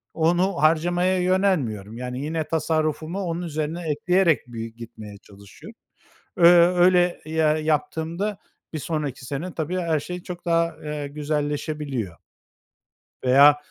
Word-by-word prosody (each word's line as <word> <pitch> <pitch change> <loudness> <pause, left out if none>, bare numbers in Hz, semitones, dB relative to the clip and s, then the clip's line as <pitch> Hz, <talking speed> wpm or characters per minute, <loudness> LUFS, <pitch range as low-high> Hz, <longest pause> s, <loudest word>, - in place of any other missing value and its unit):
onu 175 +4 +2
harcamaya 175 +4 +2
yönelmiyorum. 145 - 0
Yani 125 0 -5
yine 160 +2 -2
tasarrufumu 160 +2 -1
onun 170 -1 -3
üzerine 155 +1 -3
ekleyerek 170 0 +2
bir 115 -1 -6
gitmeye 110 -3 -10
çalışıyorum. 100 0 -15 0.6
Eee, 175 - +4 0.2
öyle, 180 0 +3
ya 155 -1 +2
yaptığımda 160 +6 -2 0.3
bir 155 - -3
sonraki 145 -4 -4
sene, 155 +7 -5
tabii, 165 +3 -3
her 165 -3 0
şey 180 +4 -7
çok 175 -1 -8
daha, 165 -1 +1
eee, 150 -1 -4
güzelleşebiliyor. 145 - -3 1.1
Veya 140 +3 +7
155 Hz, 120 wpm, -24 LUFS, 145-175 Hz, 1.1 s, Veya